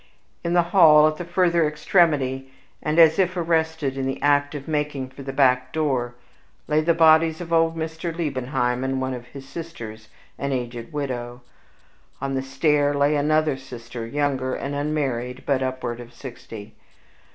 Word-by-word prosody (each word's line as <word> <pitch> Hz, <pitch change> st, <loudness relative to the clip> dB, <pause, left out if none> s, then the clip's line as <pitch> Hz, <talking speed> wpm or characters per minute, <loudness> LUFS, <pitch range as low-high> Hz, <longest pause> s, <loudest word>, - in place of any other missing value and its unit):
In 170 Hz, 0 st, -1 dB
the 175 Hz, -1 st, +4 dB
hall, 155 Hz, -5 st, +7 dB
at 155 Hz, 0 st, -2 dB
the 175 Hz, -, -5 dB
further 170 Hz, -2 st, +2 dB
extremity, 145 Hz, -5 st, +1 dB, 0.3 s
and 155 Hz, +1 st, -1 dB
as 165 Hz, +1 st, +6 dB
if 185 Hz, -1 st, +1 dB
arrested 160 Hz, -4 st, 0 dB
in 135 Hz, -, -1 dB
the 135 Hz, -, -3 dB
act 145 Hz, 0 st, +2 dB
of 140 Hz, -1 st, -7 dB
making 150 Hz, -4 st, -2 dB
for 135 Hz, +1 st, -12 dB
the 135 Hz, 0 st, -5 dB
back 130 Hz, -2 st, +2 dB
door, 130 Hz, -6 st, -1 dB, 0.5 s
lay 155 Hz, 0 st, +2 dB
the 165 Hz, +1 st, +2 dB
bodies 160 Hz, 0 st, +5 dB
of 170 Hz, -1 st, -5 dB
old 165 Hz, 0 st, +2 dB
Mr. 160 Hz, +1 st, -4 dB
Liebenheim 130 Hz, -6 st, -2 dB
and 135 Hz, 0 st, -1 dB
one 130 Hz, 0 st, -2 dB
of 125 Hz, -1 st, -8 dB
his 135 Hz, +1 st, -11 dB
sisters, 120 Hz, -11 st, -8 dB, 0.3 s
an 140 Hz, 0 st, -2 dB
aged 120 Hz, -2 st, -5 dB
widow; 125 Hz, -4 st, -5 dB, 0.8 s
on 140 Hz, 0 st, -3 dB
the 135 Hz, -, 0 dB
stair 145 Hz, +2 st, +1 dB
lay 145 Hz, +1 st, +2 dB
another 155 Hz, 0 st, +2 dB
sister, 120 Hz, -3 st, -9 dB
younger 135 Hz, -1 st, -1 dB
and 140 Hz, -, -4 dB
unmarried, 135 Hz, -4 st, -2 dB
but 135 Hz, -2 st, +1 dB
upward 130 Hz, -2 st, -3 dB
of 120 Hz, 0 st, -10 dB
sixty. 115 Hz, -5 st, -10 dB
145 Hz, 165 wpm, -23 LUFS, 130-160 Hz, 0.8 s, hall